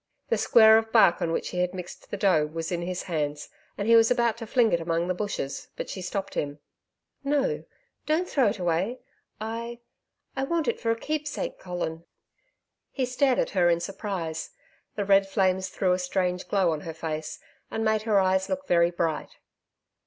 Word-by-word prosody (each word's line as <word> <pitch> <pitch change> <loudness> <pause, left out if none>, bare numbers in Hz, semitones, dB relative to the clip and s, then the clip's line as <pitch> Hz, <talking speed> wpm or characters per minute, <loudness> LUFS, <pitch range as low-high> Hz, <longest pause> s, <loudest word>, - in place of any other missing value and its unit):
The - - +2
square 220 -1 +7
of 225 0 -6
bark 215 -7 +5
on 165 - 0
which - - -2
he 180 - -4
had 180 +1 0
mixed 180 -1 -9
the 205 - -4
dough 180 -7 +3
was 165 +2 -5
in 175 -1 -1
his 180 +1 -3
hands 150 -4 -3 0.3
and 205 - -2
he 230 - +7
was 225 0 +6
about 235 -2 +2
the 225 - -6
fling 230 -1 +3
it 170 - +2
among 165 +1 0
the 185 - +1
bushes, 180 -8 -4
but - - -5
she 190 - -6
stopped 195 +2 -4
him. 145 0 -3 0.7
'No 280 -1 0 0.4
don't 320 +4 +1
throw 270 -5 +2
it 205 - 0
away.... 180 +6 0 0.4
I 230 +2 -5 0.6
I 265 0 -1
want 335 +1 -1
it - - 0
for 230 - -2
a 230 - +3
keepsake, 300 +1 -3
Colin.' 175 -2 -4 0.9
He 265 - -1
stared 255 +1 +2
at - - 0
her 175 -3 +3
in 170 0 +3
surprise. 175 -4 -4 0.5
The 205 - -1
red 195 0 +4
flames 190 -1 +1
threw 185 0 0
a 180 - 0
strange 180 0 -1
glow 190 -4 +2
on 155 -2 -3
her 160 0 -7
face, 155 -1 -4 0.3
and 225 - -2
made 220 0 +2
her 215 -2 +3
eyes 190 0 +2
look 280 0 -2
very 170 -4 +4
bright. 165 -3 -2
190 Hz, 195 wpm, -27 LUFS, 170-225 Hz, 0.9 s, square